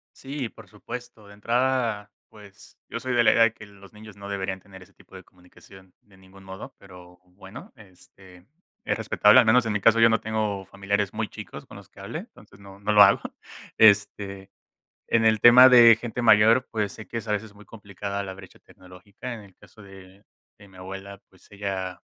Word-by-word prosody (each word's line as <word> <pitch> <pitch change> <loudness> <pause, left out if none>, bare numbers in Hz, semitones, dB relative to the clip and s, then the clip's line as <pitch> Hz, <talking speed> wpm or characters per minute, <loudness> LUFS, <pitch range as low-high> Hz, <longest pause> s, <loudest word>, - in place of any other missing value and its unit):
Sí, 140 0 -7
y - - -6
por - - -17
supuesto, 105 - -11
de 100 - -15
entrada, 115 -1 -2 0.2
pues, 105 -1 -17
yo - - -6
soy 130 -1 -4
de 120 - +3
la - - +5
idea 115 - +2
de 115 - +2
que 105 - -14
los 100 0 -18
niños 105 -1 -14
no 100 0 -11
deberían 95 -1 -4
tener 95 -1 -16
ese 95 +2 -24
tipo - - -20
de 95 - -12
comunicación 90 +1 -20
de 100 -2 -24
ningún 95 +1 -19
modo, 95 0 -11
pero, 90 -2 -16
bueno, 95 +7 -14
este, 95 -3 -19 0.4
es - - -1
respetable 110 +1 +4
al 125 - +3
menos 120 +2 +4
en 110 - -2
mi 105 - -2
caso, 115 +2 +4
yo 115 0 +6
no 115 - +1
tengo 105 -3 -3
familiares 100 +1 -3
muy 110 0 -4
chicos - - -11
con - - -14
los - - -16
que - - -20
hable, - - -7
entonces, 100 - -17
no, 100 0 -15
no 105 +1 -2
lo 105 - +6
hago. 100 0 +5 0.6
Este, 100 -2 +2 0.6
en 115 -1 +1
el 110 -1 +2
tema 125 +2 +8
de 120 -2 +7
gente 120 0 -6
mayor, 110 +3 +4
pues, 105 -3 -3
sé 110 - -12
que 115 - -8
es 115 - -5
a 105 - -2
veces 105 0 -4
muy 105 +1 -17
complicada 100 -2 -7
la 95 -1 -7
brecha 95 -1 -16
tecnológica, 95 +7 -12
en 115 - -10
el 100 -3 -18
caso 105 +1 -19
de 95 0 -16 0.4
de 100 - -16
mi 95 - -20
abuela, 95 +1 -10
pues, 95 - -24
ella 95 -2 -6
100 Hz, 210 wpm, -24 LUFS, 95-110 Hz, 0.6 s, tema